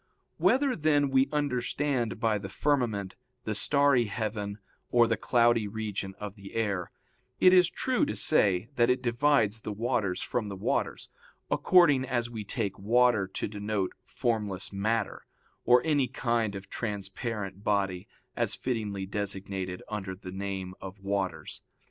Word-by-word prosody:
Whether, 265 -1 +3
then, 145 -4 +2
we 135 0 +4
understand 135 -4 -1
by 110 -2 +1
the 100 -1 -7
firmament 110 -6 0 0.3
the 110 - -2
starry 140 +2 +3
heaven, 105 -1 -3 0.3
or 120 -1 +5
the - - +1
cloudy 120 -3 +3
region 100 -2 -4
of 105 -2 -5
the 100 -2 -12
air, 100 -6 -1 0.5
it 185 - +7
is 180 -2 +6
true 260 +8 0
to - - -3
say 100 -9 +3
that 120 0 +4
it 125 0 +1
divides 120 -3 +2
the 110 - -5
waters 105 -3 -1
from 110 -4 -2
the 100 - -5
waters, 95 - -2 0.4
according 160 -8 +5
as 120 -2 -1
we 110 -2 -5
take 100 -1 -3
water 115 -1 +3
to 95 - -3
denote 105 -2 -2
formless 105 -5 -2
matter, 110 +2 -1 0.4
or 125 +1 +6
any 145 -5 +2
kind 115 -4 -1
of 100 0 -7
transparent 100 -1 -4
body, 95 -3 0 0.3
as - - +1
fittingly 105 -6 -3
designated 95 -2 -4
under 100 -3 -4
the 90 0 -9
name 95 -1 -4
of 95 +1 -8
waters. 100 -1 -3
110 Hz, 145 wpm, -29 LUFS, 100-125 Hz, 0.5 s, it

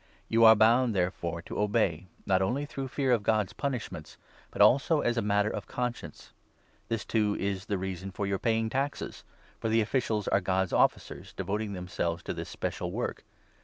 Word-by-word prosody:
You 115 0 +4
are 110 0 +10
bound, 115 +2 +4
there 90 -1 +2
5 - - -30
fore, 85 0 -3
to - - -6
obey, 100 -5 +1 0.2
not 95 -1 +2
only 130 +10 0
through 135 -2 -5
fear 135 0 0
of 120 -3 +3
God's 105 -2 +1
punishments, 120 - -4 0.3
but - - -10
also 145 +4 +5
as 120 - +1
a 115 - +1
matter 105 0 +1
of - - -5
conscience. 125 -1 -5 0.5
This, 115 -1 -2
too, 105 -2 +1
is 100 0 -2
the 100 - 0
reason 95 0 -4
for 100 +2 -4
your 100 -1 -1
6 - - -37
paying 115 -1 +2
taxes; 140 +3 -3 0.4
for 115 - -2
the 115 +1 +3
officials 110 -2 -1
are 95 - +3
God's 95 0 0
officers, - - 0
devoting 100 +2 -3
them 90 -1 -6
selves 85 -1 -2
to - - -3
this - - -6
special - - -4
work. - - -3
105 Hz, 200 wpm, -29 LUFS, 95-115 Hz, 0.5 s, are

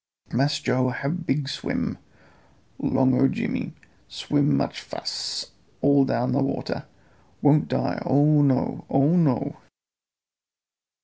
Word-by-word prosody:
Mass 140 +4 +2
Joe 130 -3 +1
hab 160 +7 -3
big 140 0 0
swim - - -3 0.8
'long 130 -1 +2
o' 135 - +6
Jimmy. - - -3 0.3
Swim 145 0 0
much - - -2
fass - - -4 0.3
all 140 -1 +4
down 125 0 0
a 140 - +2
water. 135 - -3 0.6
Won't 150 +1 +4
die, - - -1
oh 145 +2 +4
no! 135 -2 +1
Oh 140 +5 +3
no!" 150 -9 +1
140 Hz, 115 wpm, -24 LUFS, 130-145 Hz, 0.8 s, o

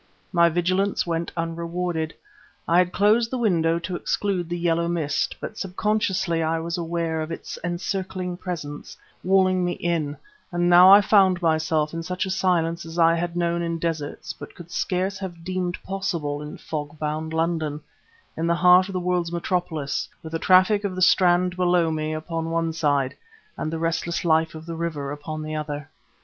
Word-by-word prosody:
My 170 -1 +5
vigilance 185 +4 +1
went 165 -1 -2
unrewarded. 165 0 -2 0.5
I 170 +1 +4
had 180 0 +2
closed 215 +4 +3
the 255 - -2
window 170 -8 +2
to 170 +2 -4
exclude 180 -1 -1
the 175 - -2
yellow 170 -1 +1
mist, 160 -4 -1
but 215 - -7
subconsciously 190 -3 0
I 160 +1 +1
was 165 +1 -3
aware 165 -1 -2
of 155 +1 -5
its 165 - -6
encircling 180 +1 -3
presence, 150 -6 -6 0.3
walling 185 -1 +3
me 175 0 0
in, 160 -4 -2 0.3
and 175 0 +1
now 180 +2 +8
I 200 +1 +10
found 190 -3 +4
myself 160 -1 +1
in 165 - -3
such 180 +2 -2
a 190 - -3
silence 170 -3 +1
as 165 +1 -9
I 165 -1 +5
had 170 +1 -2
known 170 0 0
in 170 -1 -2
deserts 160 -3 -3
but - - -11
could 175 -1 -12
scarce 185 +2 -1
have 175 -4 -7
deemed 180 0 -2
possible 170 -7 -3
in 150 0 -7
fog 150 -1 -5
bound 155 +1 -3
London, 160 -2 -1 0.6
in 165 +1 -1
the 170 - +3
heart 180 +2 +6
of - - -6
the 185 - -1
world's 180 -1 0
metropolis, 170 -4 -2
with 160 - -8
the 165 - -2
traffic 190 +4 +4
of 195 -2 -2
the 185 - +1
Strand 180 0 +4
below 175 -2 +2
me 155 0 -2
upon 165 +1 -3
one 165 0 0
side 145 -4 +1 0.4
and 155 - -3
the 165 - -2
restless 165 +1 -1
life 160 -1 +2
of 160 0 -9
the 165 0 -5
river 155 -4 -3
upon 155 +1 -5
the 155 0 -4
other. 150 -1 -5
170 Hz, 180 wpm, -24 LUFS, 160-180 Hz, 0.6 s, I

